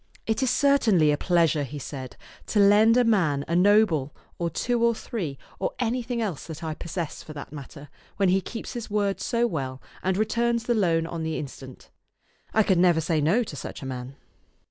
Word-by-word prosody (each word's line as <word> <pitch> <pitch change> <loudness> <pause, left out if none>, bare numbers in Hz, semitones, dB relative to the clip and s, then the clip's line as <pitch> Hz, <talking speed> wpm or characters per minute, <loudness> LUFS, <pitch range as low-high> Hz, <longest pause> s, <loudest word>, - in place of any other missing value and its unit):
" - - -39
It 220 +2 0
is 260 - +2
certainly 245 - +4
a - - +3
pleasure," 165 -2 +2
he 145 +1 -5
said, 130 -2 -7 0.3
"to 210 - +1
lend 210 +3 +6
a 250 - +5
man 170 -11 +2
a 170 - 0
noble, 180 -7 +3 0.2
or 170 -1 0
two 240 +8 -1
or 235 -1 +3
three, 170 - -5 0.2
or - - -1
anything 245 0 -1
else 185 -9 -4
that 160 0 -8
I 160 -1 -2
possess, 170 0 -5
for 155 - -10
that 145 -2 -8
matter, 145 0 -10 0.3
when 195 -2 +3
he 190 +1 +3
keeps 225 +3 -7
his 235 -3 -6
word 205 -1 0
so 235 0 +1
well, 135 - -3 0.2
and 190 0 0
returns 235 +2 +1
the 240 - +1
loan 170 -7 +2
on 165 0 -5
the 160 0 -2
instant. 135 -2 -9 0.6
I 220 - +4
could 190 -3 +2
never 175 -2 +4
say 160 -1 0
no 185 +12 +3
to 180 - -8
such - - -7
a - - -6
man." 130 0 -6
180 Hz, 205 wpm, -26 LUFS, 150-225 Hz, 0.6 s, lend